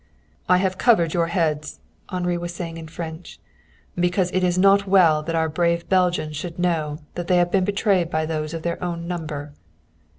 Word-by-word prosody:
"I 180 - +6
have 185 0 -1
covered 175 -10 +3
your 170 -1 +1
heads," 155 -3 -1 0.3
Henri 180 -1 -1
was 175 0 -5
saying 165 -2 -5
in 165 -1 -8
French, 160 +1 -8 0.6
"because 180 +1 +1
it 185 - 0
is 180 0 +1
not 195 +1 +4
well 175 -6 +5
that 165 +2 -3
our 160 0 +2
brave 170 +1 0
Belgians 180 -5 +1
should 165 +2 -6
know 160 -4 0 0.2
that 175 -1 -5
they 180 - +3
have 175 0 +2
been 190 -2 +2
betrayed 195 -4 +1
by 155 -2 -1
those 155 0 -3
of 165 - -6
their 170 +1 -3
own 170 -1 -4
number." 150 -4 -5
175 Hz, 190 wpm, -23 LUFS, 160-180 Hz, 0.6 s, I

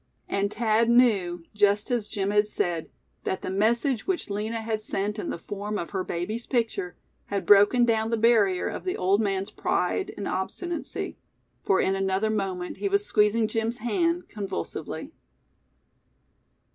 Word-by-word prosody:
And 200 +1 0
Thad 225 +1 +2
knew, 200 -8 +3
just 205 +2 +2
as 235 -4 0
Jim 200 0 -1
had 210 0 +3
said, 175 -5 -2 0.3
that 190 - -2
the - - -3
message 230 +5 +1
which 365 - -1
Lina 215 +3 -2
had 220 -1 -2
sent 210 0 -2
in - - -3
the - - -3
form 205 +4 -4
of 170 - -5
her 190 -2 -1
baby's 210 +8 -4
picture, 225 -7 -1 0.3
had 200 -2 -2
broken 205 +5 +6
down 220 -1 +1
the 230 - +1
barrier 215 -5 +3
of - - -5
the 370 - -2
old 195 +3 +2
man's 195 -2 -1
pride 390 - -1
and 205 - -4
obstinacy; 335 - -4 0.4
for 190 - +3
in 190 - +2
another 195 +2 0
moment 190 -4 -3
he 400 - -1
was 400 +1 +2
squeezing 215 - +3
Jim's 225 +2 -1
hand 335 - 0
convulsively. 195 - -5
210 Hz, 160 wpm, -26 LUFS, 195-230 Hz, 0.4 s, broken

